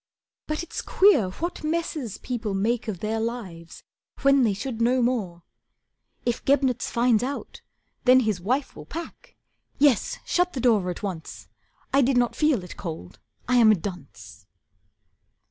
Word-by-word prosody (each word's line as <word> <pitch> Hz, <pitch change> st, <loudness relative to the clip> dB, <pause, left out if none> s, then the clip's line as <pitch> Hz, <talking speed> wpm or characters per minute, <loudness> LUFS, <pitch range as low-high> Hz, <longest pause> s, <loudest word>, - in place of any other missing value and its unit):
But 305 Hz, +2 st, -2 dB
it's 345 Hz, -, -5 dB
queer 380 Hz, -, +4 dB
What 340 Hz, -, -5 dB
messes 310 Hz, -, -2 dB
people 230 Hz, -5 st, -4 dB
make 230 Hz, +4 st, 0 dB
of 195 Hz, -6 st, -4 dB
their 220 Hz, +1 st, -1 dB
lives, 205 Hz, -8 st, -6 dB, 0.4 s
when 275 Hz, 0 st, +5 dB
They 225 Hz, -5 st, +3 dB
should 230 Hz, +2 st, -5 dB
know 250 Hz, +2 st, +3 dB
more. 200 Hz, -9 st, -1 dB, 0.8 s
If 240 Hz, -1 st, -1 dB
Gebnitz 265 Hz, -3 st, +1 dB
finds 235 Hz, -2 st, +2 dB
out, 275 Hz, +3 st, -5 dB, 0.4 s
then 255 Hz, 0 st, +7 dB
His 215 Hz, -6 st, -1 dB
wife 255 Hz, +9 st, -1 dB
will -, -, -11 dB
pack. 335 Hz, +1 st, -9 dB, 0.4 s
Yes, 280 Hz, -5 st, +3 dB
shut 360 Hz, 0 st, +1 dB
the 265 Hz, -, -4 dB
door 220 Hz, -7 st, +2 dB
at 180 Hz, -, -6 dB
once. 180 Hz, -6 st, -6 dB, 0.4 s
I 275 Hz, -, +5 dB
did 260 Hz, 0 st, +2 dB
not 245 Hz, -1 st, +2 dB
feel 300 Hz, -, +2 dB
it 180 Hz, -, -10 dB
cold, 160 Hz, -, -7 dB, 0.3 s
I 250 Hz, +1 st, +3 dB
am 225 Hz, -2 st, +7 dB
a -, -, +5 dB
dunce." 105 Hz, -, -9 dB
235 Hz, 155 wpm, -25 LUFS, 195-270 Hz, 0.8 s, then